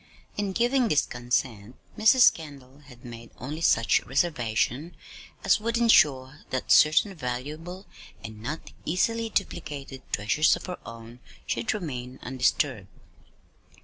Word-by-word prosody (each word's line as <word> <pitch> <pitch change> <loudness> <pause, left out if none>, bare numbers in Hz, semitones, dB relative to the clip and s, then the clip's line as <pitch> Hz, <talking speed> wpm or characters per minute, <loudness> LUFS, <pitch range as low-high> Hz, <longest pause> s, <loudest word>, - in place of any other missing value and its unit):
In 205 -1 -2
giving 245 +3 +2
this 150 -8 +2
consent, 120 -2 -3 0.2
Mrs. 220 +4 +6
Kendall 140 -4 -12
had 125 -2 -15
made 115 -1 -10
only 145 +6 -6
such 115 -7 +3
reservation 140 +1 -1 0.5
as - - +3
would 230 +2 -1
insure 145 - +3
that 130 - -3
certain 155 +6 +5
valuable 155 +6 -6 0.4
(and 110 -1 -9
not 150 +8 -6
easily 225 +7 0
duplicated) 150 -9 -4
treasures 110 +10 +2
of - - -9
her 180 -1 -6
own 115 +1 -11 0.3
should - - -1
remain 130 -9 -6
undisturbed. 125 -4 0
140 Hz, 120 wpm, -26 LUFS, 125-180 Hz, 0.5 s, Mrs